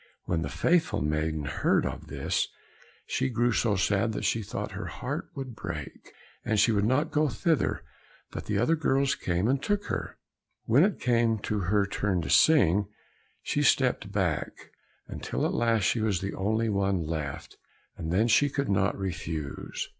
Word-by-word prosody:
When 85 -2 0
the 70 - -3
faithful 155 - +1
maiden 75 0 -1
heard - - +1
of - - -5
this, - - -1 0.6
she 130 - -1
grew 120 0 +1
so 110 -2 +1
sad 100 +3 +1
that - - -3
she 115 - +1
thought 100 - -5
her - - -5
heart - - -5
would 130 -4 -6
break, 75 -9 -7 0.3
and 110 -1 +1
she 110 +3 +5
would 105 -1 +2
not 140 +7 +1
go 155 0 +2
thither, 155 +7 0 0.5
but - - -6
the - - 0
other 165 - +3
girls 140 -3 +1
came 90 +4 -1
and 135 +2 +1
took 205 +4 -1
her. - - -4 0.5
When 125 +8 +5
it 205 0 +1
came 115 -2 +2
to 105 - -1
her 105 0 +3
turn 95 -3 -1
to - - -3
sing, 105 - +5 0.6
she 145 - 0
stepped 125 -7 +2
back, 95 -7 -2 0.4
until - - -3
at - - 0
last 115 -3 +2
she 115 - +1
was 105 -5 +1
the 95 +2 -4
only 110 +4 0
one 100 -4 0
left, 75 -3 -5 0.4
and 80 - -5
then 105 +6 +3
she 145 +5 +4
could 140 0 -2
not 95 0 +1
refuse. 80 -6 -4
105 Hz, 175 wpm, -28 LUFS, 90-125 Hz, 0.6 s, she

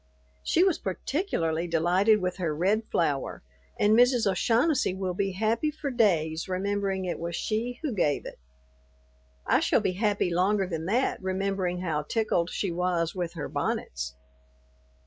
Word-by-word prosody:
She 345 - +3
was 375 -4 +2
particularly 175 - -2
delighted 180 +6 +3
with 180 0 -1
her 165 -5 -1
red 200 +7 +1
flower, 145 - -1 0.4
and 210 +1 +4
Mrs. 245 +1 +4
O'Shaughnessy 230 - +2
will 190 -1 -2
be 195 +1 -1
happy 225 +9 0
for 300 -2 -4
days 170 -8 +1
remembering 195 0 -1
it 175 - -3
was 170 0 -4
she 235 +6 -2
who 290 -6 -1
gave 150 -8 0
it. - - -9 1.1
I - - +3
shall - - +3
be - - 0
happy 200 -3 0
longer 195 +3 +2
than 165 -2 -4
that 240 +7 0
remembering 190 -1 -1
how 160 -4 -1
tickled 175 0 0
she 190 -1 -2
was 170 -1 0
with 175 -2 -3
her 165 -4 -5
bonnets. 65 0 -3
190 Hz, 150 wpm, -27 LUFS, 170-215 Hz, 1.1 s, and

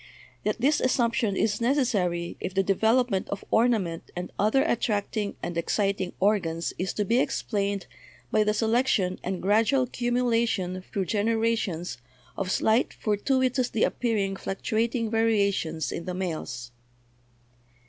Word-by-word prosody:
Yet 210 +1 -1
this 290 +5 +2
assump 240 -2 +2
tion 220 -7 0
is 210 0 +1
necessary 205 -10 +1
if 185 - -5
the 195 - +3
development 220 +2 +2
of 200 - -5
ornament 220 -8 +1
and 180 +1 -5
other 220 +7 +3
attracting 215 -6 -1
and 175 - -3
exciting 195 +2 0
organs 175 -5 +1
is 185 +2 -1
to 210 - -1
be 235 +5 +3
explained 200 -7 -1 0.5
by 215 - +4
the 210 0 +1
selection 225 -4 +1
and 185 -1 -3
gradual 225 +7 +3
cumulation 235 -7 0
through 195 -3 -1
genera 225 +4 +1
tions 175 - -4 0.4
of 195 -2 -3
slight 220 +5 +2
fortuitously 250 +2 +1
appearing 210 -5 0
fluctuating 225 +4 -1
varia 225 -3 +3
tions 160 -4 -3
in 170 - -5
the 180 -1 -3
males. 155 -10 -4
210 Hz, 135 wpm, -27 LUFS, 190-235 Hz, 0.5 s, by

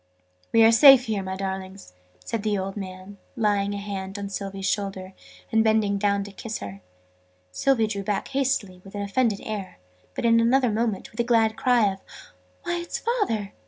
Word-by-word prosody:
"We 225 - +5
are 225 - +7
safe 265 +1 +8
here, 215 -3 -1
my 190 0 -4
darlings!" 190 - -6 0.3
said 230 - -3
the 210 -1 0
old 190 0 -4
man, 190 0 -8 0.2
laying 205 -3 +1
a - - -3
hand 200 -1 -5
on 200 0 -5
Sylvie's 195 -1 -5
shoulder, 195 -2 -3 0.4
and 225 -1 +4
bending 215 -2 +2
down 200 0 +1
to 200 - -9
kiss 215 +2 -6
her. 100 0 -8 0.7
Sylvie 255 - +2
drew 205 -2 -3
back 200 0 -2
hastily, 260 -9 -1
with 195 +1 -12
an 205 - -3
offended 205 0 0
air: 205 -3 -6 0.4
but - - -3
in 230 0 +5
another 245 +1 +3
moment, 220 -2 -2
with 220 - -15
a - - +3
glad 225 -2 +2
cry 235 -6 +3
of 190 - -13 0.6
"Why, 345 - -1
it's 345 - -4
Father!" 400 - -1
205 Hz, 185 wpm, -25 LUFS, 195-230 Hz, 0.7 s, safe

